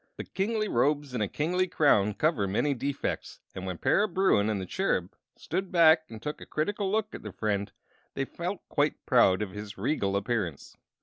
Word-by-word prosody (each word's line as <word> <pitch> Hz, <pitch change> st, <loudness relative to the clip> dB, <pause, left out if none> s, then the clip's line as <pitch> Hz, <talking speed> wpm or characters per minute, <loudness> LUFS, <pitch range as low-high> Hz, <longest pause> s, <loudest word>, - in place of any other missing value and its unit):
But -, -, -8 dB
kingly 215 Hz, +2 st, 0 dB
robes 145 Hz, -1 st, +1 dB
and 120 Hz, -, -1 dB
a 105 Hz, -, +1 dB
kingly 180 Hz, -, 0 dB
crown 105 Hz, -, +3 dB
cover 150 Hz, -11 st, +1 dB
many 140 Hz, +9 st, +1 dB
defects, 140 Hz, +2 st, -3 dB
and 95 Hz, 0 st, -6 dB
when 90 Hz, -2 st, -4 dB
Para 205 Hz, -, +2 dB
Bruin 185 Hz, -, +2 dB
and 105 Hz, -2 st, -1 dB
the 95 Hz, -, -4 dB
Cherub 95 Hz, -, -1 dB, 0.2 s
stood 190 Hz, 0 st, -3 dB
back 160 Hz, -2 st, +6 dB
and 110 Hz, -, -8 dB
took 150 Hz, +7 st, -5 dB
a -, -, -8 dB
critical 195 Hz, +5 st, -1 dB
look 215 Hz, 0 st, 0 dB
at -, -, -7 dB
their 105 Hz, -, -7 dB
friend 100 Hz, 0 st, -2 dB, 0.4 s
they 135 Hz, -, -1 dB
felt 175 Hz, +7 st, -5 dB
quite 145 Hz, 0 st, 0 dB
proud 105 Hz, -6 st, +4 dB
of 100 Hz, -, -6 dB
his 105 Hz, 0 st, -8 dB
regal 100 Hz, -3 st, 0 dB
appearance. 100 Hz, -, -3 dB
140 Hz, 190 wpm, -28 LUFS, -, 0.4 s, back